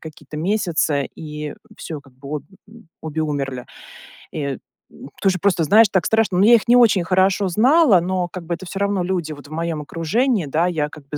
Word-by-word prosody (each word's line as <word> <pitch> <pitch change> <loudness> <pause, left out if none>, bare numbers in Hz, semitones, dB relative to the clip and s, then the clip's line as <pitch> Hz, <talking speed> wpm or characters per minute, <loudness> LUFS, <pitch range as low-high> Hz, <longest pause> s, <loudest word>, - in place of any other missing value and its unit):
какие-то 155 -1 -11
месяцы, 160 -5 0
и 150 -1 -7 0.2
всё, 155 -3 -7
как 135 -1 -21
бы, 140 +3 -6
об - - -16 0.6
обе 160 0 -3
умерли. 135 -4 -3 0.7
И, 140 -4 -3 0.3
м, - - -12
тоже 190 -2 +1
просто 185 -4 +2
знаешь, 210 +8 +6
так 190 -3 +1
страшно. 220 -5 +1
Ну, 190 - +4
я 235 - +7
их 230 - 0
не 240 - +5
очень 225 -7 +5
хорошо 190 +3 +2
знала, 235 - +4
но, 180 0 -1
как 175 -1 -8
бы, 170 - -3
это 175 +1 -7
всё 195 - -7
равно 200 -1 0
люди 175 -4 -2
вот 145 -1 -13
в - - -17
моём 165 -1 -3
окружении, 190 - 0
да, 160 +5 0
я, 155 -4 -1
как 150 -2 -14
бы, 150 +1 -5
170 Hz, 205 wpm, -20 LUFS, 150-195 Hz, 0.7 s, я